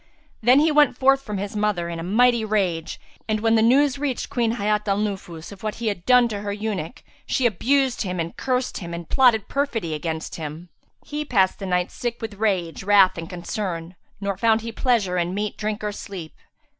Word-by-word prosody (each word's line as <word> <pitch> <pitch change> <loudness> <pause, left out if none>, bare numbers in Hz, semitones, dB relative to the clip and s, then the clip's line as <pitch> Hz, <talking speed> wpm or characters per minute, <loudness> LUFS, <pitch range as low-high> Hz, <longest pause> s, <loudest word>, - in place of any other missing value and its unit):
Then 250 +4 +6
he 310 +1 +3
went 295 -1 +4
forth 270 +1 +4
from 210 -6 -5
his 200 +2 -5
mother 205 -5 0
in 170 -1 -5
a - - -5
mighty 235 +5 +3
rage; 190 -7 -1 0.3
and 215 0 +1
when 225 0 +3
the 225 - +4
news 270 +4 +4
reached 280 -2 -2
Queen 235 -4 +1
Hayat 210 -1 0
al 195 0 +2
Nufus 195 -6 -4
of 200 - -12
what 215 -1 -3
he 230 -2 -1
had 185 -4 -6
done 250 -1 +7
with 235 - -1
her 205 0 -3
eunuch, 205 -3 -4 0.2
she 260 - +1
abused 255 +4 +2
him[FN#360] 180 -3 -3
and 165 +1 -5
cursed 255 -1 -1
him 170 -2 -7
and 170 -1 -8
plotted 240 -6 +4
perfidy 235 - -1
against 160 +1 -4
him. 160 +2 -7 0.4
He 300 0 -3
passed 195 -10 +2
the 195 - -5
night, 180 0 0
sick 240 -1 -4
with 225 -2 -5
rage, 185 -6 0
wrath 195 -1 +5
and 165 -1 -7
concern; 175 -1 -4 0.3
nor 200 -2 -2
found 225 +2 +3
he 230 +1 -5
pleasure 220 -7 +1
in 175 +2 -1
meat, 210 +1 -2
drink 215 0 -3
or 210 - -1
sleep. 190 -5 -8
210 Hz, 205 wpm, -23 LUFS, 180-235 Hz, 0.4 s, done